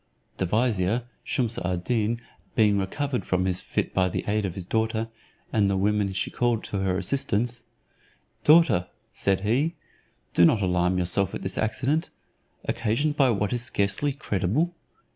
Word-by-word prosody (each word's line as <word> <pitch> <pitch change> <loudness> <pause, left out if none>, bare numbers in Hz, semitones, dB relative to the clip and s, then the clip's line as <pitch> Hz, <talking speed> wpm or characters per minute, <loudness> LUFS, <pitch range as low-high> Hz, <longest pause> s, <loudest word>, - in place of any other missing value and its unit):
The 95 - -1
vizier 110 +1 +1 0.2
Shumse 120 -3 -1
ad 90 -1 -2
Deen 115 0 0 0.4
being 105 -2 +4
recovered 130 +7 -2
from 90 0 0
his 90 -1 0
fit - - -2
by 95 -1 +2
the - - -3
aid 105 -1 +1
of 90 - -7
his 95 -3 -6
daughter, 110 +2 -1 0.4
and 105 -3 +3
the 100 - +1
women 105 0 +1
she 95 +1 -2
called 120 -2 0
to 100 - -3
her 95 -1 0
assistance; 120 -2 -1 0.8
"Daughter," 150 - +5 0.3
said 95 -1 0
he, 135 - +1 0.6
"do - - +5
not 100 +4 +4
alarm 90 0 +1
yourself 90 +2 +1
at - - -6
this 95 - -2
accident, 130 +9 0 0.6
occasioned 135 +7 0
by 135 -3 +4
what 105 -2 0
is 120 - +1
scarcely 120 +3 +1
credible. 130 - -1
105 Hz, 160 wpm, -26 LUFS, 95-120 Hz, 0.8 s, Daughter